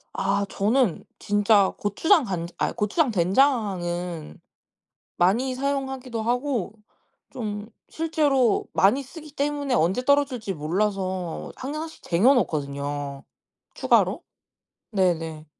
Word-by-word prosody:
아 200 +1 0
저는 215 0 +1
진짜 205 -1 +3
고추장, 310 - +3
간 180 -7 -3
아 - - +1
고추장, 240 +7 +1
된장은 180 - 0 0.8
많이 235 +9 +2
사용하기도 265 -3 -3
하고 245 -3 -1 0.6
좀 210 -3 -5 0.2
실제로 295 -8 +1
많이 210 +9 +4
쓰기 300 +3 -11
때문에 285 -1 -1
언제 190 +3 +2
떨어질지 270 -7 +1
몰라서 185 +1 -2
항상 295 +4 -4
1 - - -5
씩 - - -16
쟁여놓거든요. 145 - 0 0.5
추가로. - - +2 0.7
네네. 165 -5 0
210 Hz, 225 characters per minute, -25 LUFS, 180-270 Hz, 0.8 s, 많이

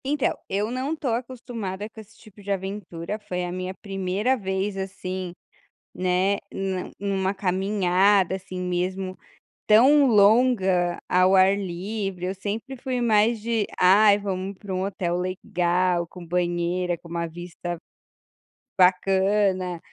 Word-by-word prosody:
Então, 285 0 0
eu 205 +3 -1
não 265 +5 -2
tô 290 -4 -3
acostumada 230 -5 -4
com 220 0 -12
esse 220 +1 -19
tipo 210 -2 -16
de 200 0 -5
aventura, 190 -1 -4
foi 180 -4 -4
a 175 - -4
minha 185 +1 -4
primeira 195 +5 0
vez, 190 -2 -2
assim, 185 -1 -5 0.6
né, 185 +2 +1
na 190 -1 -3
numa 195 -1 -1
caminhada, 190 0 +2
assim, 185 -1 -7
mesmo, 185 +1 -2 0.5
tão 275 +7 +6
longa 200 -5 +4
ao 185 +1 +4
ar 190 +1 +5
livre, 195 0 -4
eu 190 - -2
sempre 215 +7 -5
fui 255 0 -3
mais 225 -1 +3
de: 225 -1 0 0.2
"Ai 200 +3 +6
vamos 195 -1 -4
pra 195 -2 -6
um 185 +1 -1
hotel 180 -3 -2
legal, 180 -1 0
com 180 +1 -11
banheira, 175 0 -1
com 170 - -15
uma 170 0 -2
vista 175 +1 -6 1.0
bacana, 190 0 +2
190 Hz, 130 wpm, -24 LUFS, 180-210 Hz, 1.0 s, tão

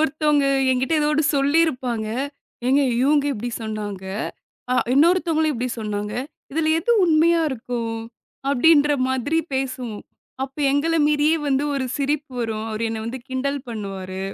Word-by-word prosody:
ஒருத்தவுங்க 300 -2 +2 0.2
எங்கிட்ட 260 +4 0
ஏதோ 295 - +2
1 300 0 +2
சொல்லியிருப்பாங்க. 275 -6 +1 0.6
"ஏங்க! 275 +2 +4 0.2
இவுங்க 285 +1 +3
இப்பிடி 240 0 -4
சொன்னாங்க, 210 -3 -5 0.7
அ - - +3 0.2
இன்னொருத்தவங்களையும் 320 -1 +3
இப்பிடி 245 +1 -2
சொன்னாங்க. 210 -1 -3 0.4
இதில 315 0 +1
எது 430 - -1
உண்மையா 335 +1 +4
இருக்கும்?" 230 -2 -3 0.5
அப்பிடின்ற 295 +1 +5 0.2
மாதிரி 260 +5 0 0.2
பேசுவோம். 255 -5 -3 0.4
அப்ப 270 +1 -12 0.2
எங்கள 320 +4 +1
மீறியே 300 +2 +3
வந்து 270 +1 +1
ஒரு 265 -1 -1
சிரிப்பு 290 0 -1
வரும். 220 -1 -2
அவரு 225 +1 -2
என்ன 225 - -3
வந்து 250 +3 -4
கிண்டல் 275 +2 -2
பண்ணுவாரு. 190 -3 -5
270 Hz, 135 wpm, -22 LUFS, 230-300 Hz, 0.7 s, அப்பிடின்ற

